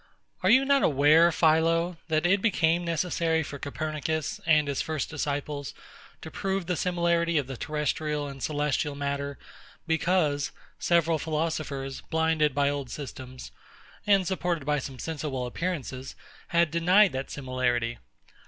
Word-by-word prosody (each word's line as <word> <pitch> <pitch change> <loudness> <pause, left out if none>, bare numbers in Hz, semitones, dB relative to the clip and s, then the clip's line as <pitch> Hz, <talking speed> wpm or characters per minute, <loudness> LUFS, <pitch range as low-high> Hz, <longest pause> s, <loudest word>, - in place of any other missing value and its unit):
Are 185 - +2
you 260 +5 +6
not 280 0 +4
aware, 155 +4 +5
PHILO, 165 +2 +2
that 155 0 +1
it 190 +2 +3
became 175 -5 +2
necessary 165 -1 0
for 140 -1 -7
Copernicus 155 +1 -3
and 155 -2 +4
his 140 -1 -1
first 155 -3 -3
disciples 145 -1 -3 0.5
to - - -8
prove 195 -1 -2
the 180 0 -1
similarity 170 -1 +1
of 145 - +1
the 135 +1 -6
terrestrial 150 +1 -2
and 135 -1 -9
celestial 145 0 -1
matter; 140 0 -3 0.5
because 160 -3 +1 0.3
several 170 -2 +2
philosophers, 150 -4 -3
blinded 160 -3 +1
by 140 0 +2
old 140 -3 -2
systems, 130 -1 -8 0.6
and 195 -2 +4
supported 175 -5 -1
by 150 0 +1
some 135 -1 -7
sensible 145 -4 -3
appearances, 135 -2 -4 0.3
had 170 -1 +2
denied 180 +4 +5
this 130 +1 -5
similarity? 125 -3 -1
155 Hz, 135 wpm, -27 LUFS, 140-170 Hz, 0.6 s, you